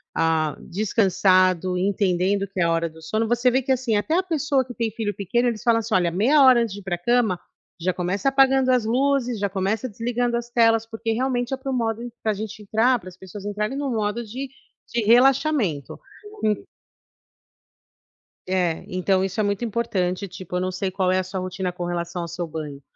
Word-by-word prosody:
ah, 160 -2 +1
descansado, 185 -2 +2
entendendo 195 +1 +1
que 195 -1 -7
é - - +4
a 170 - +2
hora 165 0 0
do 160 +1 -16
sono. 215 +8 -1
Você 240 +2 +2
vê 260 +2 +2
que 265 +1 -2
assim, 250 -3 +1
até 260 +11 0
a 370 - +2
pessoa 290 -6 0
que 245 - -9
tem 230 -1 -1
filho 215 -1 -3
pequeno, 235 +6 0
eles 220 -2 -4
falam 235 -1 +3
assim: 225 0 -4
"Olha, 175 -4 +3
meia 235 - +3
hora 255 -3 +7
antes 225 -4 -2
de 205 - -7
ir 200 - -13
para 190 -2 -2
a - - -9
cama, 225 -1 +2 0.4
já 180 +2 0
começa 185 +8 0
apagando 270 -1 +4
as 245 -3 +2
luzes, 250 0 +1
já 200 0 0
começa 200 +6 -1
desligando 235 +2 -1
as 240 0 -6
telas", 225 -1 +3
porque 225 0 -3
realmente 245 +1 -1
é - - -1
para 270 +1 -6
o - - -1
modo 225 -2 -1 0.2
para 220 - +2
a - - 0
gente 215 +1 -6
entrar, 225 +5 +2
para 185 - -10
as 180 - -16
pessoas 190 +2 -10
entrarem 210 +5 -2
em - - -2
um 275 -2 -2
modo 220 +1 -1
de 255 +6 -6 0.4
de 235 - -1
relaxamento. 245 - +3 2.5
É, 180 -3 0
então 185 +1 +1
isso 195 +3 -3
é - - +3
muito 205 +3 -1
importante. 200 -4 -1
Tipo, 180 -1 -6
eu 180 - -1
não 185 0 -1
sei 185 +1 -3
qual 185 -1 +1
é 185 - +2
a 185 - -1
sua 185 +1 -5
rotina 185 0 -3
com 175 0 -5
relação 175 0 -3
ao 170 - -4
seu 170 +1 -4
banho, 150 -3 -7
210 Hz, 215 wpm, -23 LUFS, 185-240 Hz, 2.5 s, hora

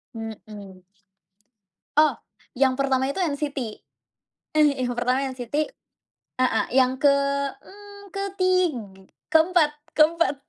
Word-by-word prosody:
Mhm. 210 -4 -9 1.1
Oh, 305 0 +6 0.4
yang 260 0 +2
pertama 265 -1 +1
itu 280 - -4
NCT, 295 -5 -2 1.0
Eh, 290 -4 +3
yang 245 - -2
pertama 250 +2 +1
NCT, 260 +4 -2 0.8
heeh, 245 -3 +2
yang 260 0 +3
ke 285 0 +5 0.5
mmm, 405 0 -14
ketig 370 -3 +1 0.6
keempat 320 -1 +4 0.2
keempat. 320 0 +3
285 Hz, 95 wpm, -24 LUFS, 255-335 Hz, 1.1 s, Oh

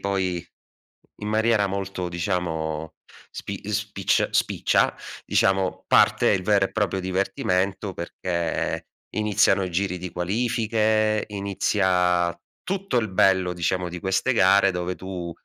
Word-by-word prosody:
poi 95 -3 -2 0.7
in 105 - -6
maniera 110 -1 +2
molto, 95 -2 -3
diciamo 80 -3 -3 0.4
spi - - -7
spiccia - - 0
spiccia, - - +2 0.3
diciamo 95 -1 +1
parte - - +4
il 95 -3 +1
vero 100 -1 +3
e - - -17
proprio 100 -3 0
divertimento, 95 +1 -1
perché 85 -1 -3 0.3
iniziano 105 -2 +3
i 90 - -4
giri 90 +1 -1
di 90 0 -6
qualifiche, 110 +2 +1
inizia 95 -3 +1 0.3
tutto 195 -3 -2
il 110 - -1
bello, 95 -1 +3
diciamo, 90 +1 -1
di 90 0 -7
queste 95 +7 +1
gare 100 -2 +5
dove 90 0 -3
tu 90 -2 -6
95 Hz, 120 wpm, -24 LUFS, 90-105 Hz, 0.7 s, gare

